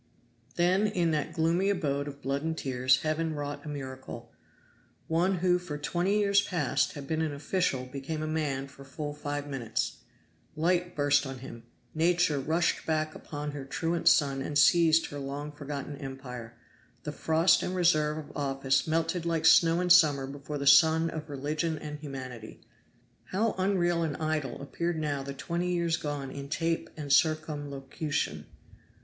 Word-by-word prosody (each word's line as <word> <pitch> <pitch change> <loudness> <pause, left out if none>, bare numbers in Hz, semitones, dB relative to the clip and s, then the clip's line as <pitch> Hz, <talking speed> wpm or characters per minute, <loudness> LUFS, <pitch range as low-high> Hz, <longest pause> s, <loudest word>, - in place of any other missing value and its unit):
Then 185 +4 +3
in 175 -5 +1
that 155 +1 -1
gloomy 170 +4 +1
abode 145 -7 -1
of 140 0 -9
blood 140 +1 -1
and 160 +1 -2
tears 130 -2 +2
Heaven 155 0 -1
wrought 145 0 -5
a 150 - -7
miracle. 130 -4 -7 0.8
One 175 +4 +2
who 180 0 +2
for 165 -5 -6
twenty 175 +7 0
years 200 -1 +4
past 180 -2 0
had 145 -4 -7
been 160 +1 -1
an 160 -2 0
official 140 -3 -1
became 140 +4 -5
a - - -2
man 145 -4 -1
for 140 0 -14
full 145 +2 -5
five 145 -1 -4
minutes. 130 -6 -3 0.6
Light 175 +2 +1
burst 145 -1 +3
on 135 0 -6
him 120 -2 -10 0.3
Nature 170 -2 +2
rushed 160 +5 0
back 155 -1 0
upon 150 0 -6
her 145 -1 -6
truant 165 +5 -2
son 140 -3 +4
and 145 +2 -2
seized 160 +3 +5
her 145 - -5
long 140 +2 -5
forgotten 145 -1 -6
empire. 125 -4 -8 0.5
The 150 - -4
frost 160 +4 +3
and 185 - -2
reserve 155 -4 +3
of 155 - -9
office 135 -1 0
melted 165 +2 0
like 165 -1 -1
snow 165 +1 +6
in 180 -1 +1
summer 150 -6 +6
before 140 +2 -6
the 140 - -4
sun 160 +3 +6
of 155 -1 -6
religion 150 +3 -2
and 150 0 -7
humanity. 130 -6 -8 0.6
How 215 +3 0
unreal 175 -3 +2
and 160 -3 -1
idle 155 -5 -2
appeared 170 +4 -2
now 145 -3 -1
the 140 0 -6
twenty 170 +5 -2
years 170 -2 +1
gone 145 -3 -4
in 140 0 -7
tape 165 +2 -1
and 145 -3 -1
circumlocution! 145 - -1
150 Hz, 165 wpm, -29 LUFS, 140-165 Hz, 0.8 s, snow